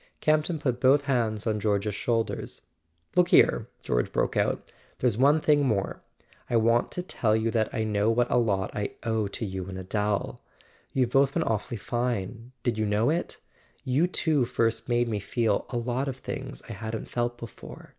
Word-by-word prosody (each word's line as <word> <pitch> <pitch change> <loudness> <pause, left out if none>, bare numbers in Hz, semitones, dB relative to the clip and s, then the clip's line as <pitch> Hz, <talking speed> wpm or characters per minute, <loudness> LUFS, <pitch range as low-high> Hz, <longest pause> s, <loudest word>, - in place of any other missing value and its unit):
Campton 155 +2 +2
put 125 -5 -1
both 135 +3 +5
hands 115 -6 0
on 110 -2 0
George's 105 0 0
shoulders. 115 +2 -2 0.5
"Look 180 -1 +5
here," - - +4 0.2
George - - 0
broke - - 0
out, - - 0 0.3
"there's 125 -4 +1
one 140 +6 +4
thing 150 -1 +3
more. 110 -7 -1 0.5
I - - 0
want 115 +1 +3
to 180 - -3
tell 110 -11 +1
you 110 +1 +1
that 110 -2 +1
I 110 - -1
know 105 0 +1
what 120 +1 +2
a - - +4
lot 100 -5 0
I 105 -1 -3
owe 110 -2 0
to 105 +3 -4
you 95 -2 -5
and 95 - -6
Adele. 105 +2 -2 0.5
You've 125 -3 +1
both 135 +1 +3
been - - +2
awfully 110 +1 -2
fine: 120 0 -3
did 115 -3 0
you 110 - +1
know 105 +6 +2
it? 170 +2 -2 0.5
You 140 +7 +2
two 160 -6 +1
first 115 -1 0
made 120 0 +2
me 105 -3 -1
feel 110 0 0
a 120 - -2
lot 125 +3 -1
of 135 -1 -3
things - - -6
I - - -7
hadn't 110 0 -5
felt 120 0 -2
before. 115 -3 -10
115 Hz, 185 wpm, -27 LUFS, 105-130 Hz, 0.5 s, both